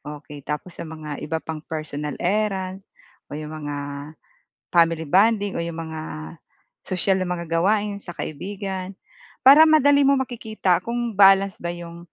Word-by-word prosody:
okey 145 0 -11
tapos 150 +4 -3
sa - - -5
mga 155 -1 -8 0.2
iba 160 +2 -2
pang 160 -1 -4
personal 150 -2 -4
errands 190 0 -1 0.5
o 145 - -4
'yong 155 0 -7
mga 145 -1 -4 1.0
family 165 -1 +3
bonding 205 -1 +3
o - - -1
'yong 170 -1 -6
mga 160 -1 -6 0.9
sosyal 190 +1 +1
na 185 - -3
mga 170 -1 -6
gawain 205 +3 +1
sa 175 - -6
kaibigan 190 +4 -5 0.6
para 280 +3 +10
madali 285 -1 +5
mo 275 - +5
makikita 220 -6 -2
kung 235 +1 -2 0.2
balance 195 -1 +6
ba 170 - -1
'yong 170 0 -9
185 Hz, 150 wpm, -23 LUFS, 160-205 Hz, 1.0 s, para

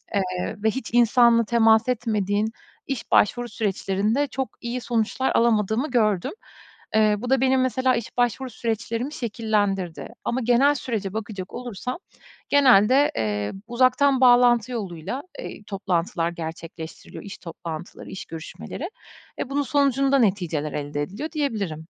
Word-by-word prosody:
eee, 185 -2 -1
ve 220 - +4
hiç 265 -1 -5
insanla 235 -1 +5
temas 225 +1 +4
etmediğin 215 -3 0 0.4
iş 270 -4 -4
başvuru 240 +3 +3
süreçlerinde, 210 +5 0
çok 265 -1 -3
iyi 240 +1 -3
sonuçlar 235 +2 0
alamadığımı 230 +3 +2
gördüm. 215 -7 +1 0.6
Eee, 215 -1 +4
bu 245 +2 -5
da 265 -1 +3
benim 260 0 +3
mesela 255 0 +2
iş 230 +1 -5
başvuru 245 +2 0
süreçlerimi 230 +4 -3
şekillendirdi 205 - -1 0.2
ama 255 +2 0
genel 250 +5 +4
sürece 215 -7 -3
bakacak 205 -4 -6
olursam, 250 - -5 0.5
genelde, 265 -1 +5
eee, 105 -2 -1
uzaktan 255 +2 +3
bağlantı 245 -1 +5
yoluyla, 200 - -4 0.2
eee, 210 - -8
toplantılar 175 -4 -1
gerçekleştiriliyor; 165 -1 -8
iş 200 -1 -8
toplantıları, 165 -1 -8
iş 190 - -7
görüşmeleri 165 - -7 0.5
ve 265 - -3
bunun 285 +1 0
sonucunda 275 -1 +2
neticeler 175 - 0
elde 145 0 -3
ediliyor 255 - -5
diyebilirim. 215 - -2
225 Hz, 130 wpm, -24 LUFS, 195-255 Hz, 0.6 s, insanla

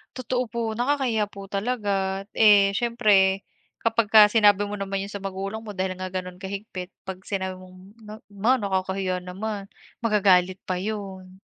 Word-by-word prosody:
Totoo 255 0 -1
po, 235 - -4 0.2
nakakahiya 250 -5 +1
po 200 - -13
talaga. 210 +1 -2 0.5
Eh, 200 -2 +7
siyempre 200 -5 +3 0.4
kapagka 220 -2 +5
sinabi 205 -2 +5
mo 205 0 -4
naman 195 0 -2
'yun 200 - -8
sa 200 - -5
magulang 195 +3 -4
mo 210 -3 -9
dahil 185 0 -1
nga 185 - -3
gano'n 185 -1 -6
ka-higpit, 195 -2 -6 0.2
'pag 190 -1 -6
sinabi 190 -2 -3
mong 185 0 -14 0.3
na, 210 - -8 0.2
"ma 220 +6 +2
nakakahiya 190 -3 -1
naman" 195 +3 -5 0.3
magagalit 190 -5 +3
pa 185 -1 -2
'yun, 190 -2 -6
200 Hz, 150 wpm, -25 LUFS, 190-215 Hz, 0.5 s, Eh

